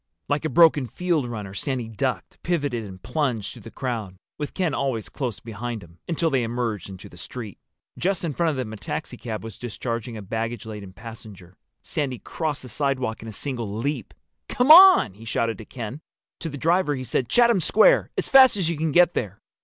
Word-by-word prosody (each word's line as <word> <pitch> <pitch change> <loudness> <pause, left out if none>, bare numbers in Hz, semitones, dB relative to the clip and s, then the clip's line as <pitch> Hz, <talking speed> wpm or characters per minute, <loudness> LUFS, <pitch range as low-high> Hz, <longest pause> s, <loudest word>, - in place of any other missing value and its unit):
Like 145 +2 0
a - - +1
broken 160 -6 +5
field 165 0 0
runner 105 -5 -6
Sandy 125 +3 -2
ducked, 110 -3 -3
pivoted, 145 -9 -1
and 95 -2 -11
plunged 125 -10 -1
through - - -12
the 115 - -10
crowd, 115 -7 -4 0.2
with 150 - -4
Ken 180 -5 0
always 130 -7 -2
close 125 -7 -4
behind 115 -1 -6
him, 85 0 -17
until 165 -1 0
they 135 -2 +2
emerged 115 -3 -2
into 95 +1 -10
the 90 - -15
street. 110 -3 -8 0.4
Just 195 +2 0
in 165 -4 -2
front 170 +3 +1
of 155 - -1
them 125 -4 -4
a - - -7
taxicab 110 +2 -5
was 110 -3 -9
discharging 115 0 -4
a 105 - -7
baggage 115 +3 -3
laden 105 -3 -8
passenger. 105 -4 -11 0.3
Sandy 135 -4 -2
crossed 155 0 -3
the 125 - -9
sidewalk 130 -3 -1
in 115 - -9
a - - -6
single 120 0 -3
leap. 130 -1 -3 0.3
"Come 250 +4 +4
on!" 365 - +9
he 105 +4 -14
shouted 115 +1 -1
to 110 - -9
Ken. 120 +5 -7 0.4
To 165 - -4
the 145 - -7
driver 165 0 +2
he 130 - -5
said, 120 0 -1
"Chatham 235 -4 +5
Square—as 195 +6 +3
fast 260 -5 +7
as 170 -4 +1
you 165 - -3
can 160 0 0
get 175 +2 +5
there!" 100 -4 -3
125 Hz, 200 wpm, -24 LUFS, 110-155 Hz, 0.4 s, on